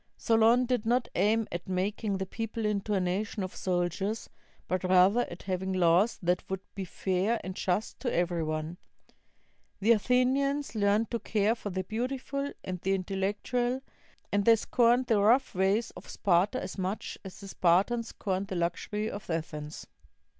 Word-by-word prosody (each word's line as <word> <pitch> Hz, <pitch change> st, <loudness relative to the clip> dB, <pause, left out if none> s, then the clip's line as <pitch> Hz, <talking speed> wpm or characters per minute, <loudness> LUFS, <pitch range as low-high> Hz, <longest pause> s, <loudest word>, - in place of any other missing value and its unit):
Solon 230 Hz, +2 st, +4 dB
did 245 Hz, -3 st, 0 dB
not 240 Hz, +2 st, +1 dB
aim 220 Hz, +1 st, +2 dB
at 175 Hz, +2 st, -5 dB
making 195 Hz, +2 st, -1 dB
the 190 Hz, -, -2 dB
people 225 Hz, +2 st, -4 dB
into 210 Hz, 0 st, 0 dB
a -, -, +2 dB
nation 190 Hz, +3 st, -1 dB
of 185 Hz, -, -6 dB
soldiers, 185 Hz, +4 st, -2 dB, 0.4 s
but 185 Hz, 0 st, -1 dB
rather 185 Hz, +6 st, +4 dB
at 175 Hz, -, -9 dB
having 190 Hz, 0 st, -2 dB
laws 180 Hz, +4 st, +3 dB
that 180 Hz, +1 st, +1 dB
would 190 Hz, -1 st, -3 dB
be 195 Hz, -2 st, -4 dB
fair 190 Hz, +5 st, 0 dB
and 185 Hz, 0 st, -5 dB
just 190 Hz, +3 st, -1 dB
to 250 Hz, -, -2 dB
every 175 Hz, -1 st, 0 dB
one. 155 Hz, +2 st, -3 dB, 1.0 s
The 210 Hz, +4 st, +3 dB
Athenians 255 Hz, +4 st, +2 dB
learned 210 Hz, +1 st, +1 dB
to 235 Hz, -, -1 dB
care 215 Hz, 0 st, +1 dB
for 225 Hz, -3 st, -6 dB
the 185 Hz, 0 st, -2 dB
beautiful 265 Hz, +6 st, -3 dB
and 180 Hz, -2 st, -5 dB
the 195 Hz, +1 st, +1 dB
intellectual, 205 Hz, +7 st, -1 dB, 0.5 s
and 205 Hz, 0 st, +2 dB
they 230 Hz, +2 st, +7 dB
scorned 240 Hz, +2 st, +3 dB
the 220 Hz, -4 st, +2 dB
rough 240 Hz, +6 st, +4 dB
ways 195 Hz, +5 st, +1 dB
of -, -, -12 dB
Sparta 195 Hz, +6 st, +2 dB
as 185 Hz, -2 st, -6 dB
much 190 Hz, +3 st, -3 dB
as 190 Hz, -2 st, -10 dB
the 200 Hz, -, -9 dB
Spartans 195 Hz, +7 st, +2 dB
scorned 195 Hz, -1 st, -3 dB
the 190 Hz, -, -4 dB
luxury 180 Hz, +5 st, -2 dB
of 205 Hz, -3 st, -7 dB
Athens. 155 Hz, -2 st, -4 dB
200 Hz, 165 wpm, -29 LUFS, 185-230 Hz, 1.0 s, they